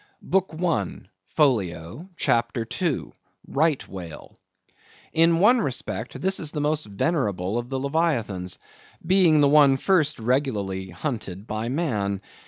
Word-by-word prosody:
BOOK 190 -3 0
I. 155 - -1 0.3
(Folio), 105 - 0
CHAPTER 115 0 +1 0.2
II. 165 -7 -1 0.4
(Right 155 0 +1
Whale).—In 95 - -3
one 235 +6 +5
respect 115 - -4
this 190 +1 0
is 155 - -3
the 150 - -4
most 150 -1 0
venerable 105 - -1
of 120 0 -7
the 135 -1 -2
leviathans, 130 - -1 0.5
being 175 -4 +5
the 145 - +5
one 140 -2 +6
first 155 -2 +2
regularly 110 -7 -1
hunted 100 - -5
by 110 +1 -3
man. 110 - -1
135 Hz, 120 wpm, -24 LUFS, 100-160 Hz, 0.5 s, one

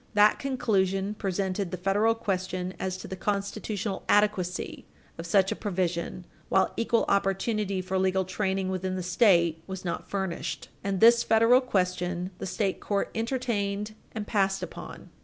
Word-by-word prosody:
That 210 0 +5
conclusion 205 -7 0
presented 195 -1 -2
the 185 - -4
federal 205 +5 +2
question 185 -4 -2
as 185 -1 -2
to - - -8
the 190 - -5
constitutional 200 +1 -2
adequacy 205 -4 +1 0.3
of 165 - -5
such 190 +2 +3
a - - 0
provision 180 -3 -2 0.2
while 190 - +3
equal 230 0 +1
opportunity 195 0 0
for 190 +1 -1
legal 190 0 +1
training 190 0 -1
within 185 0 -2
the 185 - -3
State 175 -4 +3
was 190 -1 -6
not 170 - -4
furnished, 170 -6 -3
and 195 -2 -1
this 235 +1 +7
federal 230 +3 +5
question 180 -5 -1
the - - -4
state 190 +1 -1
court 200 -1 -1
entertained 220 -4 -2 0.2
and 215 -1 -4
passed 195 -2 +1
upon. - - -9
195 Hz, 150 wpm, -28 LUFS, 185-210 Hz, 0.3 s, this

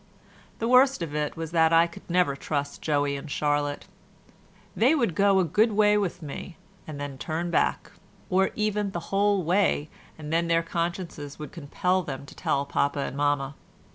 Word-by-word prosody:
The 230 - -2
worst 255 -4 +5
of 155 -3 -6
it 150 +1 -2
was 165 -1 -5
that 165 -1 +4
I 165 0 +6
could 170 +1 -12
never 175 -5 +2
trust 145 0 -3
Joey 145 -2 0
and 140 +2 -7
Charlotte; 145 0 -1 0.9
they 260 +8 +4
would 235 - +1
go 200 +3 +4
a - - +4
good 215 +7 +2
way 210 0 +4
with 195 -5 -1
me 155 +3 -7 0.3
and 150 -2 -7
then 140 -2 -6
turn 170 +1 -3
back, - - 0 0.4
or 190 +1 +2
even 210 -2 -1
the 170 - -2
whole 200 -1 +3
way 175 -3 +1 0.3
and 155 0 -6
then 170 +1 +2
their 165 0 +2
consciences 170 -4 -4
would 150 - -8
compel 180 +4 -1
them 140 -4 -6
to - - -13
tell 140 0 -1
papa 140 0 0
and 135 - -4
mamma. 145 -1 0
165 Hz, 180 wpm, -26 LUFS, 145-190 Hz, 0.9 s, I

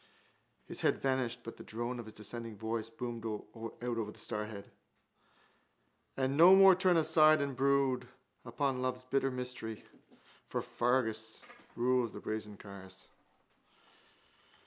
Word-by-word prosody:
His - - -6
head - - +3
vanished 130 -3 0
but 115 - -8
the - - -10
drone 120 +2 -4
of 120 - -6
his 110 - -11
descending 115 +1 -7
voice 110 0 -3
boomed 115 0 -6
out 115 +1 -6
of 115 -3 -2
the - - -15
stairhead: 105 -1 -5 1.5
And 135 +1 0
no 175 +5 +9
more 195 0 +9
turn 185 -1 +3
aside 155 -1 +5
and 140 -2 -2
brood 135 -1 +2 0.4
Upon 130 +2 -1
love's 130 0 -2
bitter 135 +1 +1
mystery 125 -4 -5 0.6
For - - -2
Fergus 110 -3 -1 0.3
rules 125 -1 +1
the - - -7
brazen 105 -1 -5
cars. 95 -1 -11
120 Hz, 130 wpm, -33 LUFS, 110-135 Hz, 1.5 s, no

